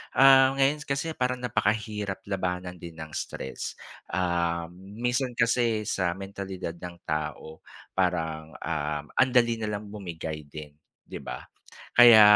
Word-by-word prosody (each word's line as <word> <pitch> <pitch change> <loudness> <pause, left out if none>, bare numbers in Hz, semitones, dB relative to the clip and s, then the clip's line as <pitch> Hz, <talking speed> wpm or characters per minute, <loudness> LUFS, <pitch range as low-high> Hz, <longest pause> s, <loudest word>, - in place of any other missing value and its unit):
ah, 135 0 +7
ngayon 140 +2 +3
kasi 140 +4 -1
parang 125 -3 0
napakahirap 105 -4 -1
labanan 90 -2 -3
din 85 -1 -9
ng 80 -1 -7
stress, 65 - -5 0.3
ah 85 -2 0
minsan 120 +7 -2
kasi 115 -2 +2
sa 95 -4 0
mentalidad 95 -2 -5
ng 90 0 -7
tao 75 +1 -4 0.3
parang, 80 -4 -1
uhm, 75 -2 -2
andali 120 -3 +4
na 110 - -2
lang 105 0 -10
bumigay 80 -7 -6
din, 75 0 -9 0.3
di - - -8
ba? 60 - -6 0.5
Kaya, 120 -3 +10
95 Hz, 125 wpm, -27 LUFS, 85-120 Hz, 0.5 s, Kaya